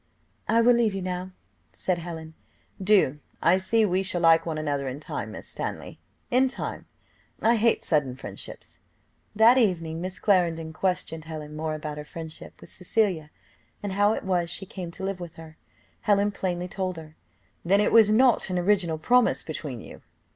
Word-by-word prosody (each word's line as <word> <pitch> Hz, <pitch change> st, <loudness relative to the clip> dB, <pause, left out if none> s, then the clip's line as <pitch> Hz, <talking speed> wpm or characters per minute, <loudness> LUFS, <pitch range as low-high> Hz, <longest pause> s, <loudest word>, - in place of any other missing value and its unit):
"I 230 Hz, +2 st, +4 dB
will 245 Hz, +1 st, +6 dB
leave 230 Hz, -4 st, +2 dB
you 190 Hz, -, -3 dB
now," 180 Hz, 0 st, -3 dB, 0.4 s
said 180 Hz, -2 st, -1 dB
Helen. 160 Hz, -2 st, -7 dB, 0.5 s
"Do, 190 Hz, -8 st, +3 dB, 0.2 s
I 175 Hz, +3 st, +4 dB
see 220 Hz, +4 st, +2 dB
we 185 Hz, -1 st, +1 dB
shall 185 Hz, -2 st, 0 dB
like 165 Hz, 0 st, +5 dB
one 160 Hz, -2 st, -2 dB
another 145 Hz, -3 st, -2 dB
in 130 Hz, +2 st, -5 dB
time, -, -, -5 dB
Miss -, -, -9 dB
Stanley; -, -, -5 dB, 0.3 s
in 255 Hz, +2 st, +4 dB
time, 260 Hz, -, -5 dB, 0.5 s
I 230 Hz, +2 st, +4 dB
hate 230 Hz, +1 st, +2 dB
sudden 145 Hz, -6 st, +1 dB
friendships." 100 Hz, -6 st, -8 dB, 0.6 s
That 230 Hz, +4 st, +6 dB
evening 165 Hz, -7 st, 0 dB
Miss 185 Hz, 0 st, -4 dB
Clarendon 165 Hz, -5 st, +1 dB
questioned 165 Hz, -2 st, -2 dB
Helen 155 Hz, -1 st, -7 dB
more 155 Hz, 0 st, -2 dB
about 150 Hz, -1 st, -5 dB
her -, -, -5 dB
friendship 160 Hz, +1 st, -8 dB
with -, -, -11 dB
Cecilia, 180 Hz, -5 st, 0 dB, 0.5 s
and 200 Hz, -2 st, -2 dB
how 205 Hz, +2 st, +3 dB
it -, -, -4 dB
was 180 Hz, -3 st, 0 dB
she 195 Hz, -, -1 dB
came 185 Hz, -2 st, -7 dB
to 180 Hz, +3 st, -9 dB
live 195 Hz, -1 st, -2 dB
with 170 Hz, -2 st, -8 dB
her. 160 Hz, -1 st, -12 dB, 0.4 s
Helen 205 Hz, 0 st, +2 dB
plainly 180 Hz, -2 st, -3 dB
told 185 Hz, -1 st, -3 dB
her. 155 Hz, -1 st, -11 dB, 0.5 s
"Then 195 Hz, +4 st, +3 dB
it 210 Hz, -, +2 dB
was 225 Hz, -2 st, +7 dB
not 235 Hz, -1 st, +4 dB
an 180 Hz, -, -1 dB
original 180 Hz, -3 st, +2 dB
promise 245 Hz, +10 st, +3 dB
between 145 Hz, -6 st, -6 dB
you?" -, -, -12 dB
180 Hz, 175 wpm, -26 LUFS, 160-205 Hz, 0.6 s, was